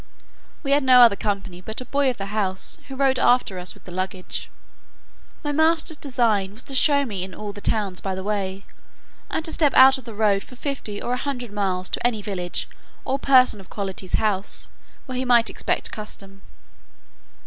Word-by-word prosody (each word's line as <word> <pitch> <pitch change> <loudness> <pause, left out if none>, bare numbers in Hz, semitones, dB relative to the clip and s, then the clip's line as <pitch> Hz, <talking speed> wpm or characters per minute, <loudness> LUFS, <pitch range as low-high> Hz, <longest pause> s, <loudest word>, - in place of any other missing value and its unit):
We 275 - -2
had 285 0 +4
no 255 -1 +7
other 230 -4 +7
company 195 -4 -3
but 220 +4 -5
a 255 - -7
boy 280 0 +1
of 250 - -3
the 195 +1 -6
house, 190 -3 -1
who 270 - -7
rode 265 -1 +2
after 245 -7 +3
us 180 0 -5
with - - -19
the 180 - -11
luggage. 185 0 -4 0.9
My 295 - -1
master's 320 +1 +2
design 225 -9 0
was 245 - -6
to 275 - -9
show 280 +1 +4
me 200 -7 -4
in 185 0 -6
all 210 -1 -6
the 205 - -9
towns 200 -5 -1
by 190 -1 -3
the 190 - -5
way, 195 -1 -3 0.6
and 320 - -2
to 320 - 0
step 295 -4 +2
out 265 +1 +8
of 255 - -15
the 230 -3 -8
road 205 -2 +2
for 250 - -12
fifty 250 -6 -4
or 245 - -2
a - - 0
hundred 250 -4 -4
miles, 185 -3 -1
to - - -3
any 220 -4 -3
village, 180 -4 -3 0.4
or 270 +1 -1
person 255 -6 +5
of 190 - -14
quality's 190 -2 -3
house, 205 -3 -2 0.3
where 255 -2 -4
he - - 0
might 240 -2 +4
expect - - -2
custom. 195 -2 -7
215 Hz, 200 wpm, -23 LUFS, 195-260 Hz, 0.9 s, out